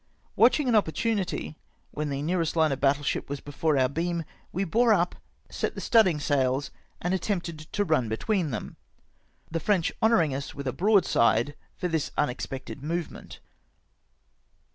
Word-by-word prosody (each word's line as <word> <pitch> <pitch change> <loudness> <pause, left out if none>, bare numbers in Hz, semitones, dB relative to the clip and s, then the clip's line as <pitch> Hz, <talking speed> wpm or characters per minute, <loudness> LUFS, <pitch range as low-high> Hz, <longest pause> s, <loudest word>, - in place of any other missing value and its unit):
Watching 255 +4 +4
an 245 - +2
opportunity, 205 -3 0 0.4
when 150 0 -3
the 140 0 -3
nearest 170 0 0
hiie 160 -2 +3
of 135 - -2
battle 140 +1 +2
ship - - -2
was 140 0 -3
before 145 +2 -1
om^ 130 0 +2
beam, 170 +1 -1 0.3
we 190 - -1
bore 230 +6 +3
up, 175 -3 +1 0.3
set - - -3
the - - -5
studding 200 -10 +4
sails, 135 -1 0 0.3
and 175 +2 -1
attempted 175 -4 -2
to 165 +6 -2
run 140 - +1
between 175 - 0
them, 110 -5 -5 0.7
the 165 - -1
French 180 0 +1
honouring 220 - +3
us 140 +1 -5
with 140 -1 -6
a 130 - -1
broadside 145 - +3 0.2
for 180 - -1
this 160 -4 -1
unex 145 -4 -1
pected 135 +1 -7
movement. 165 +3 -5
160 Hz, 160 wpm, -27 LUFS, 140-185 Hz, 0.7 s, Watching